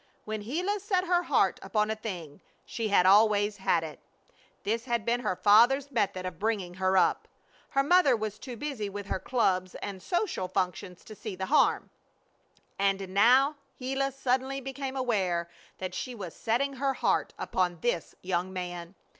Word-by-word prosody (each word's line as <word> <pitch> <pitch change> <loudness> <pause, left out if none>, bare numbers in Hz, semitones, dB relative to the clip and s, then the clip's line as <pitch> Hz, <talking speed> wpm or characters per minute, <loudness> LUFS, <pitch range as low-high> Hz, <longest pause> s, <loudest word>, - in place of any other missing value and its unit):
When 215 0 -4
Gila 355 - -2
set 380 -2 0
her 355 -1 +3
heart - - +2
upon 210 0 0
a - - -1
thing 180 -9 -7 0.2
she 225 -2 -3
had 200 -3 +4
always 205 +1 +4
had 175 -3 +1
it. 155 -2 -8 0.6
This 230 +3 -1
had 235 -3 -1
been 235 +1 +1
her 210 -6 -1
father's 245 +9 +5
method 195 -6 -1
of 185 - -6
bringing 205 -5 -1
her 190 +1 +1
up. 180 - +2 0.4
Her 275 - +2
mother 315 -4 +5
was 215 -1 -4
too 250 -3 -8
busy 255 -7 -4
with 200 0 -6
her 190 - -2
clubs 185 -5 0
and 200 -1 -5
her - - -18
social 350 - -1
functions 180 0 -3
to 215 - -11
see 215 -1 -7
the 190 +1 -3
harm. - - +3 0.9
And 195 -1 +1
now 255 +9 +4 0.2
Gila 270 +1 -1
suddenly 265 +1 -1
became 270 0 -5
aware 190 -9 0 0.3
that 185 -1 -5
she 250 +6 -5
was 185 -7 -7
setting 265 +4 -1
her 270 0 0
heart - - 0
upon 175 -3 -1
this 240 -9 -1
young 185 0 -1
man. 175 -1 -6
215 Hz, 170 wpm, -29 LUFS, 185-260 Hz, 0.9 s, father's